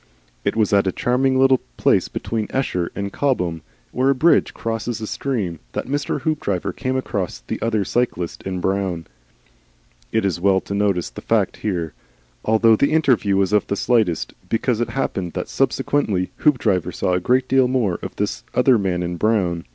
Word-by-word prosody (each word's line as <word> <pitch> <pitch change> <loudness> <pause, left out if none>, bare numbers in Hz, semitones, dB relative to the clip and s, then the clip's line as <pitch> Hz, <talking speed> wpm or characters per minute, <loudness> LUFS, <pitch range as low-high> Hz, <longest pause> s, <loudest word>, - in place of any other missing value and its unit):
It - - 0
was 110 -1 +1
at 100 -1 +4
a - - +2
charming 130 +4 +1
little 135 -1 +5 0.2
place - - +3
between 110 -2 -3
Esher 90 -10 -1
and 100 -1 -4
Cobham, 90 - 0 0.3
where 130 +2 +1
a 140 - +3
bridge 165 +6 +3
crosses 115 +1 -3
a 110 - -4
stream, 110 - -3
that - - -3
Mr. 145 +1 -2
Hoopdriver 130 - -1
came 130 -1 -2
across 100 -8 -3
the - - -5
other 110 -3 0
cyclist 105 -8 -1
in 95 -1 -4
brown. 95 -3 -1 1.1
It 110 - +1
is 90 -3 -1
well 95 0 +4
to - - -6
notice 100 -4 0
the - - -9
fact - - +1
here, 85 -7 -3 0.5
although 110 0 +4
the 140 +7 +1
interview 125 -11 +3
was 95 +1 +1
of 105 - +3
the - - -1
slightest, 110 -7 +1 0.2
because 115 0 0
it 120 - -1
happened 95 -10 -2
that - - -3
subsequently 100 -11 0
Hoopdriver 105 - +2
saw 90 - -1
a 90 - +2
great 125 +7 +2
deal 130 -1 +4
more 120 -9 0
of - - -7
this - - -2
other 125 -2 +4
man 90 -3 -1
in 85 0 -3
brown. 90 -5 +1
105 Hz, 180 wpm, -21 LUFS, 90-125 Hz, 1.1 s, little